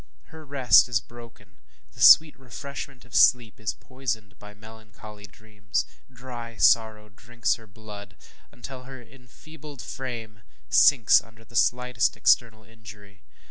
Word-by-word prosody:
Her 160 Hz, 0 st, -12 dB
rest 135 Hz, -3 st, +4 dB
is 115 Hz, -3 st, +1 dB
broken 110 Hz, -4 st, -16 dB, 0.3 s
the -, -, -13 dB
sweet 155 Hz, -1 st, +7 dB
refreshment 135 Hz, 0 st, -10 dB
of 125 Hz, -, -21 dB
sleep 115 Hz, -1 st, +3 dB
is 105 Hz, -5 st, -4 dB
poisoned 110 Hz, -6 st, -7 dB
by 105 Hz, 0 st, -14 dB
melancholy 110 Hz, -1 st, -14 dB
dreams 100 Hz, 0 st, -5 dB, 0.3 s
ŌĆ£dry 120 Hz, -2 st, -10 dB
sorrow 110 Hz, -2 st, +2 dB
drinks 115 Hz, +3 st, -3 dB
her 115 Hz, -2 st, -10 dB
blood, 105 Hz, -1 st, -13 dB
ŌĆØ -, -, -20 dB, 0.2 s
until 130 Hz, +1 st, -11 dB
her 135 Hz, 0 st, -11 dB
enfeebled 140 Hz, +3 st, -14 dB
frame 115 Hz, -5 st, -8 dB, 0.3 s
sinks 135 Hz, -7 st, +5 dB
under 115 Hz, 0 st, -20 dB
the 120 Hz, -, -17 dB
slightest 125 Hz, -1 st, 0 dB
external 110 Hz, 0 st, +1 dB
injury. 105 Hz, -3 st, -16 dB
115 Hz, 135 wpm, -24 LUFS, 105-125 Hz, 0.3 s, sweet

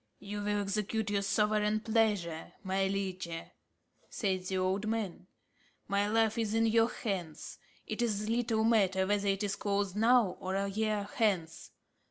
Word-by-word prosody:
"You 205 Hz, +1 st, -6 dB
will 205 Hz, 0 st, 0 dB
execute 210 Hz, +1 st, -1 dB
your 200 Hz, -1 st, +1 dB
sovereign 210 Hz, +1 st, +2 dB
pleasure, 210 Hz, -8 st, 0 dB
my 190 Hz, 0 st, +1 dB
liege," 190 Hz, -2 st, -2 dB, 0.8 s
said 190 Hz, -4 st, -1 dB
the 190 Hz, 0 st, -1 dB
old 190 Hz, +3 st, 0 dB
man. 215 Hz, -5 st, -3 dB, 0.6 s
"My 200 Hz, +1 st, +1 dB
life 225 Hz, +1 st, +2 dB
is 220 Hz, -1 st, 0 dB
in 225 Hz, 0 st, +3 dB
your 225 Hz, +1 st, +4 dB
hands. 185 Hz, -11 st, -5 dB, 0.3 s
It 215 Hz, +2 st, -3 dB
is 215 Hz, -3 st, 0 dB
little 230 Hz, -1 st, +1 dB
matter 195 Hz, -5 st, +3 dB
whether 205 Hz, +1 st, 0 dB
it 195 Hz, +1 st, +1 dB
is 200 Hz, -1 st, -1 dB
closed 200 Hz, -2 st, -1 dB
now 225 Hz, -3 st, +4 dB
or 185 Hz, +1 st, -3 dB
a 200 Hz, 0 st, 0 dB
year 210 Hz, 0 st, -1 dB
hence. 190 Hz, -8 st, 0 dB
205 Hz, 155 wpm, -32 LUFS, 195-220 Hz, 0.8 s, your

